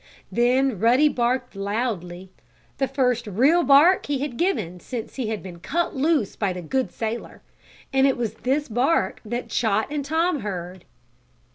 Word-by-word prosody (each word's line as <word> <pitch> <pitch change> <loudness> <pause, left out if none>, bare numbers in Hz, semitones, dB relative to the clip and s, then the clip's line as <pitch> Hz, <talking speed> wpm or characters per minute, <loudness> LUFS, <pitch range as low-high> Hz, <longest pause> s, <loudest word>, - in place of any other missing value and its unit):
Then 250 -1 +2
Ruddy 250 +8 +4
barked 245 -3 -1
loudly 195 -3 -3 0.5
the 270 - +1
first, 250 -3 0
real 265 - +3
bark 320 +5 +5
he 290 -1 0
had 275 -2 -4
given 215 - -1
since 230 +3 -6
he 255 -4 -2
had 215 -2 -3
been 180 -2 -9
cut 340 - -2
loose 285 - +1
by 200 -3 -1
the 180 - -6
good 260 +10 -1
sailor. 225 +1 -5 0.5
And 270 0 +4
it 270 - +1
was 230 -3 -2
this 270 +6 -1
bark 250 +8 +1
that 240 +3 -4
Chot 220 +2 0
and 295 -1 -2
Tom 320 +2 0
heard. 185 -3 -6
245 Hz, 160 wpm, -24 LUFS, 210-275 Hz, 0.5 s, bark